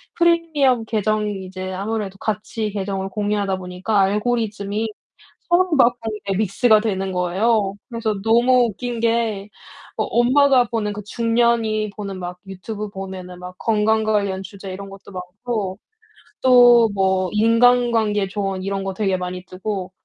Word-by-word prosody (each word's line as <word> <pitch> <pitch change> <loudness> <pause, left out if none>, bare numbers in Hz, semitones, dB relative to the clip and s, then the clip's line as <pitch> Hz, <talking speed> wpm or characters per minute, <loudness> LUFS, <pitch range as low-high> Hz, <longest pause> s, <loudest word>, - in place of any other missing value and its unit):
프리미엄 320 -8 +2
계정이 210 -2 -1
이제 185 0 -6
아무래도 200 0 -3
같이 215 +1 -3
계정을 195 -1 -3
공유하다 205 -1 -1
보니까 185 +3 -2
알고리즘이 210 +1 0 0.6
서로 365 +2 +3
막 245 -3 +4
아이 220 -2 -4
예 - - -2
믹스가 215 +2 +3
되는 195 -3 -2
거예요. 195 +3 +1
그래서 230 -3 -2
너무 240 +2 +4
웃긴 240 +3 -5
게 225 -3 0 0.5
어 - - +1
엄마가 255 +1 +4
보는 210 -3 -1
그 210 +1 -7
중년이 230 -1 +1
보는 200 -2 -6
막 180 0 -6
유튜브 205 +3 -6
보면은 190 -2 -8
막 180 0 -9
건강 220 0 +2
관련 200 -3 0
주제 195 -1 -9
이런 195 +1 -8
것도 195 0 -13
많고 195 +2 -4 0.6
또 245 -3 +7
뭐 190 -1 +1
인간관계 230 -2 +3
조언 195 -2 -3
이런 195 0 -2
거 195 0 -3
되게 195 -2 0
많이 180 0 -5
뜨고 190 0 -5
210 Hz, 300 characters per minute, -21 LUFS, 195-230 Hz, 0.6 s, 또